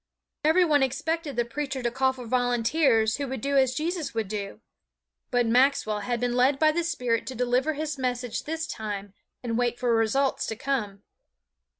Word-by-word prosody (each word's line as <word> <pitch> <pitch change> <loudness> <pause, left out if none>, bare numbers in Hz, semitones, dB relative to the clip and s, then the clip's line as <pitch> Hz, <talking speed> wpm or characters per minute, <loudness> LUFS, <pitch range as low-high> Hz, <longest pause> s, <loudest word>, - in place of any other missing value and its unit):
Every 330 +4 +4
one 295 -3 +3
expected 290 +4 -1
the 240 0 +1
preacher 270 +1 -4
to 240 - 0
call 265 +1 +2
for 255 -2 -9
volunteers 245 -1 +2
who 285 -1 -3
would 265 -1 -4
do 280 +3 -1
as 260 -2 +3
Jesus 320 -1 -3
would 225 -3 -1
do. 200 - -5 0.7
But 245 -1 +2
Maxwell 240 -3 +2
had 240 +3 -2
been 245 0 -1
led 260 +3 +3
by 310 +1 +4
the 340 +2 -1
Spirit 250 -9 -1
to 260 - -5
deliver 250 +5 +1
his 300 -1 -4
message 245 -2 -2
this 320 +1 -3
time 205 -5 -5 0.3
and 230 -1 -1
wait 240 -1 0
for 245 -1 +1
results 245 +5 +1
to 220 - -3
come. 210 -6 -3
250 Hz, 185 wpm, -26 LUFS, 230-280 Hz, 0.7 s, Every